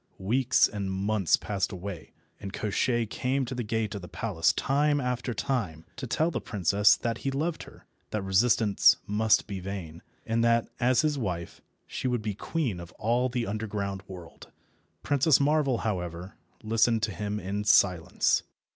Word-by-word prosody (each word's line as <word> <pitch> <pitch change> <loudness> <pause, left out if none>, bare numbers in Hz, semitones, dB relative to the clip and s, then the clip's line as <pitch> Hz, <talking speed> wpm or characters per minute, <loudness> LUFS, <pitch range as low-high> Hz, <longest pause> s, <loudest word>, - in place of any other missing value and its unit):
Weeks 125 +7 +3
and 100 -2 -4
months 95 -1 +1
passed 100 0 -2
away 95 -3 -7 0.3
and 100 -1 -6
Koshchei 115 +4 0
came 130 +5 -1
to 125 - -5
the 125 - -3
gate 110 -1 -2
of 100 - -5
the 90 - -9
palace 90 -7 0
time 145 +2 +1
after 125 -1 -2
time 100 - -2
to 130 - -5
tell 160 +7 +1
the - - -3
princess 100 0 +3
that 115 -1 -3
he 135 - -2
loved 155 +5 -2
her, - - -19 0.2
that 105 -2 -3
resistance 105 +2 +4
must 105 +1 +2
be 100 -2 -5
vain, 90 -4 -7 0.2
and 115 +1 0
that, 115 0 +3
as 125 0 +3
his 150 -2 0
wife, 90 -7 -4 0.2
she 130 - -3
should 120 -3 -1
be 105 -1 -2
queen 120 - -2
of 85 0 -10
all 120 +4 0
the 120 -2 -2
underground 100 -2 -3
world. 90 -3 -11 0.5
Princess 145 +1 +3
Marvel, 140 -3 +2
however, 90 -3 -3 0.3
listened 115 0 +2
to 110 - +1
him 105 +3 -3
in 100 +2 -3
silence. 95 -4 +3
110 Hz, 165 wpm, -28 LUFS, 95-125 Hz, 0.5 s, resistance